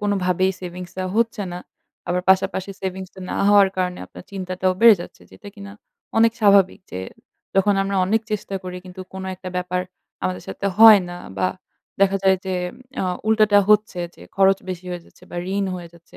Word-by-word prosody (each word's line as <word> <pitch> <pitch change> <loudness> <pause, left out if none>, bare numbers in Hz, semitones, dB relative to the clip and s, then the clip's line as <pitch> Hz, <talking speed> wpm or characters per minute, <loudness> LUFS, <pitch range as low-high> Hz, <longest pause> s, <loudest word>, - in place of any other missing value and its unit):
কোনভাবেই 190 -2 +1
সেভিংস 180 -1 -7
টা 185 - -1
হচ্ছে 230 -2 +1
না। 175 - -5 0.5
আবার 180 +1 0
পাশাপাশি 190 0 +1
সেভিংস 190 0 -5
টা 190 - -12
না - - -3
হওয়ার 205 -1 +6
কারণে 180 -1 -1
আপনার - - -13
চিন্তাটাও 185 -1 -1
বেড়ে 230 -1 +9
যাচ্ছে, - - -10
যেটা 210 - -12
কিনা 200 -1 -10 0.5
অনেক 230 0 +5
স্বাভাবিক। 200 -3 +4
যে 90 - -5 0.6
যখন 200 +1 +4
আমরা 195 0 -2
অনেক 215 +4 +1
চেষ্টা 210 -2 -3
করি 180 0 -6
কিন্তু 185 0 -10
কোন 190 0 -6
একটা 185 0 -8
ব্যাপার 180 0 -1 0.4
আমাদের 90 0 -2
সাথে 95 - -4
হয় 220 -2 +10
না 175 - -7 0.2
বা 95 -1 +2 0.5
দেখা 195 0 +4
যায় 190 -1 +4
যে 190 - -1 0.5
আ - - 0 0.2
উল্টাটা 215 -2 +4
হচ্ছে 210 -3 +3 0.2
যে - - -15
খরচ 195 0 +4
বেশি 185 -1 -5
হয়ে 175 -1 -5
যাচ্ছে - - -23
বা - - -7 0.2
ঋণ 200 - +1
হয়ে 175 -2 -8
যাচ্ছে, 170 0 -18
190 Hz, 185 wpm, -22 LUFS, 180-200 Hz, 0.6 s, হয়